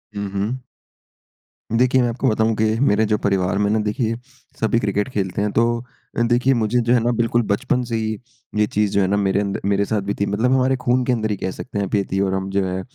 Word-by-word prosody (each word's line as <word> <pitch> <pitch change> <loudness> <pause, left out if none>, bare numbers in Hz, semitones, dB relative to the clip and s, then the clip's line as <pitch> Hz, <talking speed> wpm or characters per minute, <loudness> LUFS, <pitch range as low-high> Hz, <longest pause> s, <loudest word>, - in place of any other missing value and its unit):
हुँ, 100 -1 -3
हुँ। 105 +6 -2 1.2
देखिए, 130 +1 +4
मैं 120 - +1
आपको 130 +3 -1
बताऊँ 110 +1 +1
कि 110 - +1 0.2
मेरे 110 -5 +3
जो 105 0 +1
परिवार 95 -1 +1
में 100 0 +1
ना, 110 - +2
देखिए, 110 +2 -1 0.4
सभी 115 +1 +2
क्रिकेट 105 +2 -1
खेलते 95 -4 -2
हैं। 105 0 0
तो 115 - +3 0.5
अ, - - +2
देखिए, 125 +3 +3
मुझे 115 +1 +1
जो 120 +1 +2
है 120 - +5
ना, 120 - +2
बिल्कुल 120 0 +2
बचपन 125 +4 0
से 115 - -1
ही 110 -1 -1 0.4
ये 105 - +5
चीज़ 105 -1 0
जो 100 - +2
है 95 - +2
ना, 100 +2 +1
मेरे 100 -1 +1
अंद 100 -1 -2
मेरे 100 0 +2
साथ 105 -1 -1
भी 100 +1 -2
थी 100 - +2
मतलब 110 +6 0
हमारे 130 0 +3
खून 125 +1 +2
के 130 - +1
अंदर 110 -2 -1
ही 100 - -1
कह 95 0 -3
सकते 115 - -7
हैं 100 - 0
आप, 100 - -2
ये 100 - +2
थीं 95 +1 +1
और 95 -1 0
हम 95 0 -2
जो 100 -1 +1
है 95 +1 -3
105 Hz, 255 wpm, -21 LUFS, 100-120 Hz, 1.2 s, है